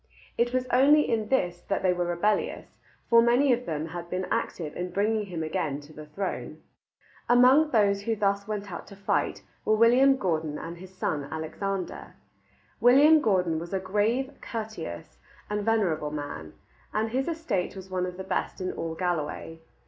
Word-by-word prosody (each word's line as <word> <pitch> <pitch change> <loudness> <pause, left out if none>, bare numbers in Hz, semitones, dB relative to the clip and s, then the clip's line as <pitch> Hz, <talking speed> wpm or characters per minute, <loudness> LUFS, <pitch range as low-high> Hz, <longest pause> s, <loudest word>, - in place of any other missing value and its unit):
It 240 +1 +1
was 255 0 0
only 285 +4 +5
in 220 -2 0
this 175 -9 0
that 195 - -1
they 185 -1 +4
were 175 -1 -1
rebellious, 190 +5 0 0.4
for 230 0 +6
many 245 +3 +4
of 245 +1 -3
them 155 -1 -2
had 175 0 -7
been 185 +1 -2
active 155 -4 -2
in 180 +1 -3
bringing 210 +2 0
him 170 -4 -4
again 155 -3 -2
to 145 +2 -15
the 155 0 -10
throne. 190 +6 -5 0.7
Among 255 +6 +6
those 200 -5 +3
who 225 +2 -1
thus 200 -1 0
went 205 -2 -4
out 170 - -7
to 200 - -12
fight 195 0 -1 0.2
were 215 - +3
William 250 +5 +5
Gordon 160 - -1
and 170 +1 -7
his 185 +1 -11
son 155 -6 -2
Alexander. 180 +4 -4 0.6
William 290 +6 +6
Gordon 180 - +1
was 170 +3 -5
a - - +1
grave, 210 +8 0
courteous, 165 - -6 0.3
and 210 0 -1
venerable 190 -9 +1
man, 145 - -6 0.4
and 220 +1 -1
his 265 +2 -1
estate 285 - -2
was 190 0 -10
one 180 -1 -1
of 180 0 -7
the 190 - -5
best 190 - -2
in 185 -1 -2
all 165 -1 -4
Galloway. 165 -2 -3
195 Hz, 175 wpm, -27 LUFS, 170-230 Hz, 0.7 s, for